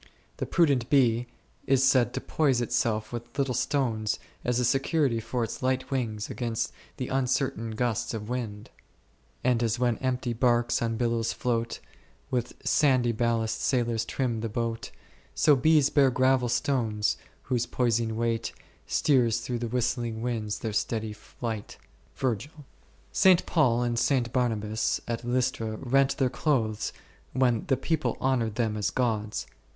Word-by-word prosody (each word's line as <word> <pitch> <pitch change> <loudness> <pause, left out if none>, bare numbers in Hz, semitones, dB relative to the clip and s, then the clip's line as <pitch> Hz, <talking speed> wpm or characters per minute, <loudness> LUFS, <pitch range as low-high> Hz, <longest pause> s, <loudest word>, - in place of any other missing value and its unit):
The - - -3
prudent 140 -9 +2
bee 125 -4 +3 0.4
is 135 -1 +4
said 130 -3 +4
to - - -2
poise 140 -6 +1
itself 110 -2 0
with 120 0 -7
little 135 -2 +1
stones 115 -5 0 0.3
as 125 0 +1
a 125 - +2
security 135 -1 +2
for 120 +2 -2
its 115 - -5
light 130 +1 -1
wings 110 -6 -2
against 115 -3 -3 0.2
the 125 - -4
uncertain 130 -3 0
gusts 120 -1 -1
of 105 -1 -5
wind, 110 -4 -5 0.7
And 125 -2 +2
as 115 0 +1
when 120 -2 +1
empty 125 -2 -1
barks 120 0 +2
on 115 -1 -1
billows 115 -1 0
float, 115 -1 -1 0.5
With 125 -2 -1
sandy 130 -5 +3
ballast 115 -1 0
sailors 120 -3 +1
trim 115 0 -2
the 115 - -2
boat, 115 0 -3 0.5
So 150 - +5
bees 150 +1 +4
bear 140 -2 +5
gravel 130 0 +2
stones, 115 -6 +1 0.3
whose 125 -1 -1
poising 115 -2 0
weight 115 -1 -1 0.3
Steers 120 -5 +2
through 120 0 -3
the 120 - -2
whistling 120 -1 -1
winds 110 -4 -2
their 110 -2 -4
steady 110 0 -1
flight. 110 0 -6 1.3
St. 185 -3 +5
Paul 125 -7 +2
and 120 -1 0
St. 125 -3 +1
Barnabas 110 -4 0
at 115 0 -3
Lystra 120 -3 -1
rent 135 +3 +2
their 130 -2 +1
clothes 120 -6 0 0.4
when 125 -4 +2
the 135 - +2
people 155 +4 -1
honoured 120 -5 0
them 110 -3 0
as 105 -1 0
gods. 110 -4 -1
120 Hz, 145 wpm, -27 LUFS, 115-130 Hz, 1.3 s, So